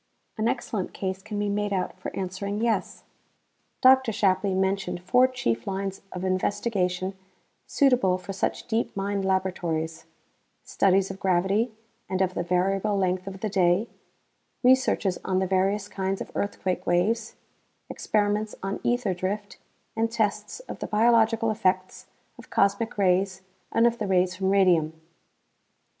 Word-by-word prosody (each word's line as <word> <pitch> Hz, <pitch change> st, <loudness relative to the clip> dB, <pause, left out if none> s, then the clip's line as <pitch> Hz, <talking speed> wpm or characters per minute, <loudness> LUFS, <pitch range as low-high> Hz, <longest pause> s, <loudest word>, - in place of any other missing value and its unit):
An 220 Hz, 0 st, 0 dB
excellent 225 Hz, -6 st, -2 dB
case 190 Hz, 0 st, -3 dB
can 210 Hz, +1 st, -6 dB
be 205 Hz, 0 st, 0 dB
made 205 Hz, 0 st, -1 dB
out 190 Hz, -2 st, -2 dB
for -, -, -5 dB
answering 195 Hz, +2 st, -3 dB
yes. 230 Hz, 0 st, -1 dB, 0.8 s
Dr. 260 Hz, -2 st, +6 dB
Shapley 195 Hz, -1 st, +1 dB
mentioned 190 Hz, -2 st, -1 dB
four 250 Hz, +7 st, +4 dB
chief 115 Hz, -, -2 dB
lines 195 Hz, 0 st, -3 dB
of 180 Hz, -, -6 dB
investigation 185 Hz, -1 st, -1 dB, 0.5 s
suitable 250 Hz, -10 st, +3 dB
for 190 Hz, +2 st, -7 dB
such 190 Hz, -, -2 dB
deep 230 Hz, -3 st, -1 dB
mine 200 Hz, 0 st, -1 dB
laboratories: 180 Hz, -4 st, -1 dB, 0.6 s
studies 195 Hz, 0 st, +2 dB
of 190 Hz, -, -9 dB
gravity 195 Hz, +5 st, +1 dB, 0.4 s
and 185 Hz, -, -1 dB
of 185 Hz, -1 st, +1 dB
the 175 Hz, -, -2 dB
variable 195 Hz, +4 st, +1 dB
length 185 Hz, 0 st, 0 dB
of 195 Hz, 0 st, -7 dB
the 220 Hz, -, -1 dB
day, 190 Hz, +2 st, +2 dB, 0.8 s
researches 250 Hz, -7 st, +3 dB
on 185 Hz, -, 0 dB
the 190 Hz, -, +2 dB
various 195 Hz, +2 st, +1 dB
kinds 195 Hz, -1 st, -2 dB
of -, -, -7 dB
earthquake 190 Hz, -2 st, -2 dB
waves, 215 Hz, +7 st, +1 dB, 0.5 s
experiments 210 Hz, 0 st, -1 dB
on 195 Hz, +1 st, -3 dB
ether 240 Hz, -5 st, +1 dB
drift 195 Hz, +3 st, -4 dB, 0.4 s
and 225 Hz, 0 st, +1 dB
tests 210 Hz, -, -2 dB
of -, -, -9 dB
the -, -, -4 dB
biological 225 Hz, 0 st, +3 dB
effects 185 Hz, -3 st, -1 dB, 0.3 s
of -, -, -13 dB
cosmic 200 Hz, +3 st, +1 dB
rays 190 Hz, 0 st, +1 dB, 0.3 s
and 230 Hz, -, +3 dB
of 235 Hz, 0 st, +2 dB
the 210 Hz, -, -2 dB
rays 185 Hz, -1 st, +2 dB
from 190 Hz, 0 st, -1 dB
radium. 175 Hz, -5 st, +3 dB
195 Hz, 145 wpm, -26 LUFS, 185-215 Hz, 0.8 s, Dr